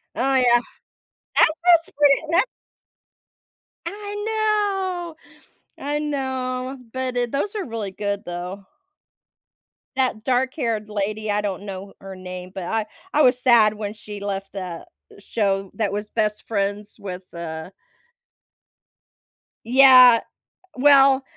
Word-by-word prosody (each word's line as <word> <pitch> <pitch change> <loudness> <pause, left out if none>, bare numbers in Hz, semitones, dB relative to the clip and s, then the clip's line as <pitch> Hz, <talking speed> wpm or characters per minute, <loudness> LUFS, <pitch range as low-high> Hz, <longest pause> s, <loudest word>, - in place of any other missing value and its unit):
Oh, 270 +2 +1
yeah. 245 -2 +5 0.8
That's 315 - +6 0.3
just - - -23
pretty 285 -1 +5
that 345 +6 +5 1.4
I 410 +3 -6
know, 400 -6 -1 0.7
I 290 +1 -1
know, 260 -3 -3
but 260 -1 -3
it 245 -1 -1
those 340 +10 -2
are 405 - -2
really 225 -4 -5
good, 200 +1 -3
though. 180 +3 -6 1.3
That 255 -5 0
dark 255 +1 +1
haired 225 -7 -2
lady- 210 +1 -2
I 205 0 +1
don't 200 -2 -4
know 195 -1 -8
her 195 0 -9
name- 185 0 -8
but 190 - -5
I 220 +3 -1 0.3
I 300 - +4
was 250 -3 +4
sad 235 -4 +5
when 210 -1 -5
she 210 -1 -9
left 195 -1 -4
the 180 -4 -6 0.3
show 195 -2 -1
that 210 -3 -1
was 210 +1 -4
best 215 -2 -1
friends 205 -1 -2
with, 185 -2 -8
uh 160 -1 -6 2.0
Yeah, 255 -1 +8 0.6
well, 275 0 +6
225 Hz, 125 wpm, -22 LUFS, 200-270 Hz, 2.0 s, Yeah